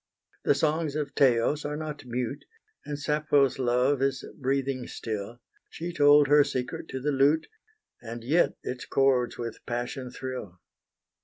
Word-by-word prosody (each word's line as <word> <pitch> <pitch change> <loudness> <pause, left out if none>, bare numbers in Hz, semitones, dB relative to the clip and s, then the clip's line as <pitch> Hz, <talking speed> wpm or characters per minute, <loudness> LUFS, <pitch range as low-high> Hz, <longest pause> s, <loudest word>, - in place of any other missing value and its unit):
The - - +4
songs 155 0 0
of 150 -2 -3
Teos 135 +3 +3
are 150 0 -3
not 150 -3 -6
mute, 125 +2 -3 0.4
And 145 -1 -3
Sappho's 145 -2 +2
love 125 +2 +2
is 135 -1 0
breathing 135 -2 -1
still: 110 +1 -5 0.3
She 170 +1 -6
told 145 -1 +6
her 145 +1 +6
secret 125 -2 -4
to 130 - -5
the 150 +3 0
lute, 140 +3 +3 0.6
And 115 0 -7
yet 155 +8 +2
its 125 0 -5
chords 130 -3 +2
with 115 -2 -6
passion 120 +2 -3
thrill. 125 -8 -7
135 Hz, 145 wpm, -27 LUFS, 125-145 Hz, 0.6 s, told